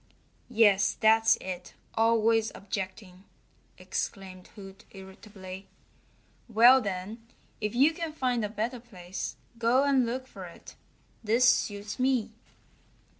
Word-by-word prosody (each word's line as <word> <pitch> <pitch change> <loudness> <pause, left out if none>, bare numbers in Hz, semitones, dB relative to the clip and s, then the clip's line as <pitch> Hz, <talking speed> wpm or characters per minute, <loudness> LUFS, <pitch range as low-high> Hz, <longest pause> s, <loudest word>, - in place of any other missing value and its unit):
"Yes, 205 -4 +3
that's 225 0 +5
it 180 -1 -7 0.2
always 225 0 +2
objecting!" 190 -1 -7 0.5
exclaimed 185 -2 -6
Hoot 195 0 -12
irritably. 190 0 -11 0.8
"Well, 240 +4 +6
then, 205 +3 -6 0.3
if 210 +1 -3
you 280 +6 +4
can 330 -1 -5
find 250 -6 -1
a 210 - -2
better 225 +4 -3
place 190 -6 -7 0.2
go 240 +4 +3
and 275 -2 +3
look 255 +2 -4
for 195 -7 -10
it. 170 - -13 0.5
This 230 +4 +3
suits 205 -3 0
me." 255 -4 +1
220 Hz, 115 wpm, -28 LUFS, 195-240 Hz, 0.8 s, Well